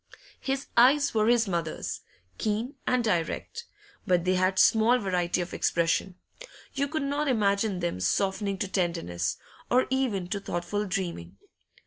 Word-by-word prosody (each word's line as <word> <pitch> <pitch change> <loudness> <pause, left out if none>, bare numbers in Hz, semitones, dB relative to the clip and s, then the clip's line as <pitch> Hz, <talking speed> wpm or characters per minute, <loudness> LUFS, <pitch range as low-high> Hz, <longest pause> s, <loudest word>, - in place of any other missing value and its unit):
His 270 +1 -2
eyes 280 +4 +5
were 215 -1 +2
his 235 -1 +3
mother's 170 -4 -3 0.4
keen 225 +5 -1
and 250 -1 +2
direct; 210 - -2 0.4
but 180 -2 +2
they 185 - +3
had 185 +1 +1
small 225 +5 +5
variety 180 -5 0
of 175 - -6
expression; 170 +2 0 0.6
you 280 0 0
could 310 0 -2
not 285 +2 -1
imagine 200 -5 +1
them 170 - -2
softening 195 - 0
to 195 - -2
tenderness, 170 - -1 0.3
or 250 +1 +4
even 240 -9 0
to 200 - -2
thoughtful 200 +3 -3
dreaming. 170 - -4
200 Hz, 140 wpm, -27 LUFS, 175-240 Hz, 0.6 s, eyes